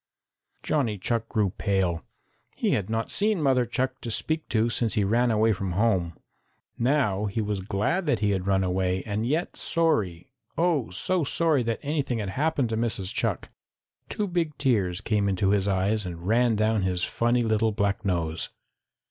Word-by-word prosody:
Johnny 120 -9 0
Chuck 115 +4 -2
grew 105 -5 +1
pale. 95 -5 0 0.5
He - - 0
had 100 -1 0
not 115 0 -2
seen 210 -1 +2
Mother 130 -5 +2
Chuck 130 +2 -2
to 120 - -5
speak 155 +7 -2
to 115 0 +2
since 115 -1 0
he 105 - +2
ran 120 +5 +2
away 110 0 +3
from 95 -2 -3
home. 90 -5 +1 0.6
Now 120 -6 +1
he 105 +2 -2
was 105 -2 -1
glad 105 - -1
that 140 -5 +3
he 105 0 +1
had 95 -1 -2
run 95 -1 +2
away, 90 0 0
and 110 +2 -2
yet 160 +6 -1
sorry, 125 - 0 0.2
oh, 165 -8 +1
so 170 - 0
sorry 155 0 +2
that 115 -1 -1
anything 140 -4 -1
had 105 -3 -3
happened 140 +1 0
to 110 - -1
Mrs. 110 -5 -1
Chuck. - - -1 0.6
Two 210 - -2
big 165 -5 -1
tears 105 -9 +1
came 105 -2 +1
into 95 0 +1
his 100 -1 +2
eyes 100 +2 +1
and 85 -2 -7
ran 115 +1 +3
down 110 0 +1
his 90 -1 0
funny 120 +1 +1
little 110 0 +2
black 100 -1 -1
nose. 85 -4 -1
110 Hz, 175 wpm, -26 LUFS, 95-130 Hz, 0.6 s, away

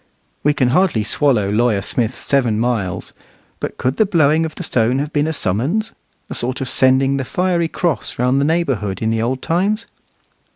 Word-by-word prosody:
We 150 0 +2
can 125 -4 +2
hardly 150 - +2
swallow 110 -5 +2
Lawyer 105 -2 +1
Smith's 120 +3 -1
seven 120 -6 +1
miles; 115 -6 -2 0.5
but - - -5
could 130 +2 -1
the 220 - +4
blowing 160 -3 +3
of 160 - -6
the - - -6
stone 120 -4 +1
have 145 +3 -3
been 145 +1 +1
a - - 0
summons, 145 - -1 0.4
a - - -6
sort 125 +2 -2
of 135 - -3
sending 135 +2 +3
the 135 - -2
fiery 175 +4 0
cross 160 - -2
round 125 +3 +2
the - - +2
neighbourhood 135 - -1
in 110 - +1
the 110 0 0
old 130 +3 -2
times? 205 +7 0
135 Hz, 190 wpm, -18 LUFS, 115-160 Hz, 0.5 s, the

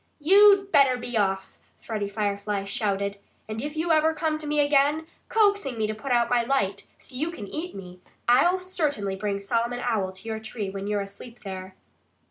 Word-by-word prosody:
"You'd 395 +4 +6
better 270 -3 +5
be 245 0 -6
off!" 195 -2 -1 0.2
Freddie 210 -3 -4
Firefly 200 -1 -2
shouted. 200 0 -2 0.3
"And 220 +1 -4
if 295 +2 -5
you 330 +2 0
ever 320 0 +3
come 310 0 -1
to 305 - -7
me 300 0 +1
again, 290 +2 +3 0.2
coaxing 405 - +2
me 220 - +1
to 215 - -2
put 215 +5 -6
out 240 -1 +3
my 245 -1 +3
light 205 -6 -1
so - - -15
you 300 +6 -1
can 275 -12 -7
eat 325 - -5
me 180 -2 -10 0.3
I'll 270 +10 +5
certainly 300 - -1
bring 200 0 -2
Solomon 235 +4 -1
Owl 210 -6 0
to 190 +4 -11
your 220 -1 -3
tree 220 -2 -5
when 195 0 -5
you're 205 -1 0
asleep 215 +5 -10
there." 190 -1 -7
235 Hz, 190 wpm, -26 LUFS, 200-300 Hz, 0.3 s, You'd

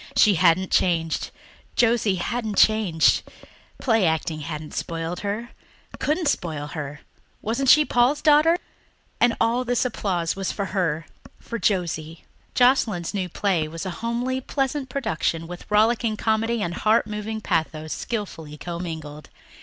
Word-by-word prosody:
She 210 - +6
hadn't 180 +1 +3
changed 165 -3 +1 0.5
Josie 230 -4 +3
hadn't 220 +3 -3
changed. 210 -7 +4 0.6
Play 225 -7 +3
acting 160 0 -1
hadn't 150 0 -6
spoiled 165 +1 -3
her 210 +4 -3 0.5
couldn't 315 +2 0
spoil 155 - -1
her. 150 -2 -6 0.4
Wasn't 240 +5 0
she 305 +2 +7
Paul's 250 +4 +3
daughter! 310 +3 +5 0.6
And 240 -1 +3
all 235 +2 +2
this 245 0 0
applause 185 -8 -1
was 195 -1 -2
for 200 - -3
her 165 -5 0 0.3
for 235 - -6
Josie. 170 -4 -1 0.3
Joscelyn's 235 -9 +3
new 190 -3 -2
play 175 -4 0
was 165 +3 -6
a 185 - -2
homely, 245 +3 -1
pleasant 270 0 -2
production 165 - -1
with 175 +1 -9
rollicking 220 +1 +2
comedy 225 +1 0
and 175 - -2
heart 215 +5 +2
moving 215 +1 -4
pathos 160 -5 -1
skilfully 165 -9 -5
commingled. 160 -3 -6
200 Hz, 135 wpm, -24 LUFS, 165-235 Hz, 0.6 s, she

